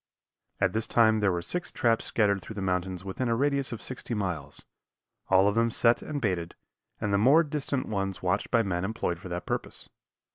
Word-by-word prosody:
At 95 -1 +2
this 110 0 0
time 110 -2 +4
there 105 -2 +2
were 85 -1 -2
six 175 - -2
traps 115 -2 +1
scattered 100 -3 +1
through 105 +4 -9
the 100 - -4
mountains 90 0 -2
within 100 +6 -3
a 115 - +2
radius 140 +1 +1
of 115 - -6
sixty 125 -2 -4
miles, 85 -9 -4 0.6
all 95 +1 +5
of 100 - +2
them 115 +1 +2
set 115 +1 +4
and 150 -2 -4
baited, 90 -7 -2 0.4
and 105 -1 -1
the 100 - +3
more 140 +10 +6
distant 140 -3 -2
ones 95 -3 -3
watched 90 0 0
by 115 -2 +3
men 90 -3 -2
employed 95 -4 -2
for 90 - -9
that 90 0 -4
purpose. - - -3
105 Hz, 205 wpm, -28 LUFS, 95-120 Hz, 0.6 s, more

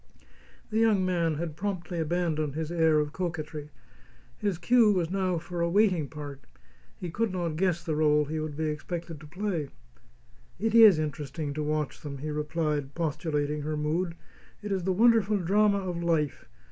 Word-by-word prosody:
The 220 - +1
young 215 -4 +3
man 170 -3 +1
had 160 0 -4
promptly 185 -2 -3
abandoned 160 -3 -1
his 160 0 -3
air 160 -2 +3
of 150 0 0
coquetry. 155 -4 -4 0.7
His 200 -5 -1
cue 225 +5 +4
was 175 -4 0
now 185 -2 0
for 175 +1 -5
a 170 - +2
waiting 185 -5 +3
part; 145 -2 -8 0.5
he 175 - -5
could 225 +3 0
not 175 -4 -2
guess 175 0 0
the 160 - -3
rôle 150 -1 +3
he 155 +1 -3
would 155 -2 -4
be 160 - -1
expected 165 +1 -4
to 155 - -12
play. 180 -3 -3 0.9
"It 225 +3 -1
IS 220 -6 +8
interesting 150 -1 -3
to 155 - -3
watch 150 -1 -2
them," 140 -2 -6
he 150 +3 -4
replied, 150 -2 -2
postulating 150 -2 -1
her 155 +1 -2
mood. 165 +3 -1 0.5
"It 205 - -4
is 190 -3 -1
the 190 - +2
wonderful 215 0 +4
drama 200 +3 +3
of 180 -3 -3
life. 160 -4 0
165 Hz, 170 wpm, -28 LUFS, 150-185 Hz, 0.9 s, IS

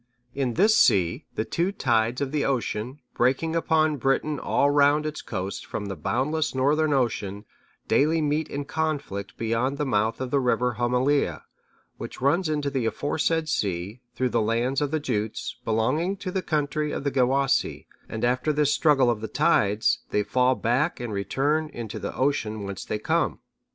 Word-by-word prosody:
(642) 140 - -4
In 125 -3 0
this 215 +3 +4
sea, 85 -3 +3
the 110 - -1
two 175 +9 0
tides 120 - +1
of 135 -1 -1
the 150 -1 0
ocean, 120 -4 -1
which 135 +3 -15 0.4
break - - -10
upon 155 -2 +2
Britain 135 +3 0
all 145 - +2
round 145 +1 +4
its 155 0 -4
coasts 95 +2 -4
from 105 - -5
the 100 -1 -4
boundless 140 - -1
northern 150 +4 +2
ocean, 110 -6 -1 0.4
daily 155 +3 +3
meet 150 +1 0
in 140 -1 -4
conflict 140 -11 -3
beyond 115 +5 -1
the 150 - -1
mouth 110 -2 0
of 130 -1 -4
the 140 - +3
river 125 -2 +1
Homelea,(643) 125 +4 +1 0.6
which - - -7
runs 155 +6 +2
into 145 -2 -1
the 130 -4 0
aforesaid 160 +5 0
sea, 100 - -2
through 130 -1 0
the 120 -1 +1
lands 120 +5 0
of 145 - 0
the 155 +2 0
Jutes, 110 -5 -3
belonging 130 - 0
to 185 -1 -5
the 190 - -1
country 150 -2 -1
of - - -4
the 140 - 0
Gewissae; 135 +1 +1 0.2
and 110 +1 -2
after 125 +5 +1
this 145 -1 +2
struggle 135 -6 +4
of 105 -2 -3
the 110 - -3
tides, 105 0 +2
they 105 - +1
fall 125 +5 +2
back 125 - 0
and 120 -3 -4
return 140 +11 0
into 115 -6 -6
the - - -5
ocean 115 -6 -1
whence 100 -1 -5
they 110 - -3
come. 105 - 0
130 Hz, 180 wpm, -25 LUFS, 115-150 Hz, 0.6 s, this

